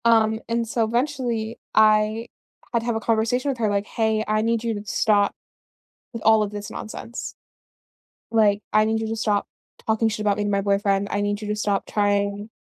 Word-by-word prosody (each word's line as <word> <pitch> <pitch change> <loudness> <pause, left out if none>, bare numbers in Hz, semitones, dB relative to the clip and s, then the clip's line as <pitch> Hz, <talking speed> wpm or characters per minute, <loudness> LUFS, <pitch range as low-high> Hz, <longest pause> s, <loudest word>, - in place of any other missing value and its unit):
Um, 220 -1 +4
and 230 0 0
so 230 0 0
eventually, 235 -2 -1 0.2
I 215 +1 +4 0.5
had 235 - +3
to 230 - -7
have 235 -1 0
a - - 0
conversation 230 +4 +1
with 270 - -2
her 220 -2 +1
like, 200 0 0
"Hey, 220 -1 0
I 215 0 +1
need 230 0 0
you 230 -1 0
to 205 0 -7
stop 205 0 +2 0.8
with 230 -2 -6
all 220 -1 +6
of 205 - -2
this 205 0 -7
nonsense, 230 +2 -7 1.0
like, 210 -2 +3
I 215 0 +4
need 220 0 0
you 220 - -2
to 225 - -2
stop 210 -2 0 0.4
talking 220 0 +2
shit 215 -1 -2
about 205 -1 +1
me 210 - 0
to - - 0
my 200 -1 +1
boyfriend. 200 0 +1
I 205 - 0
need 205 +1 -1
you 210 - -5
to 210 - 0
stop 205 -2 0
trying" 205 0 0
215 Hz, 205 wpm, -23 LUFS, 205-225 Hz, 1.0 s, all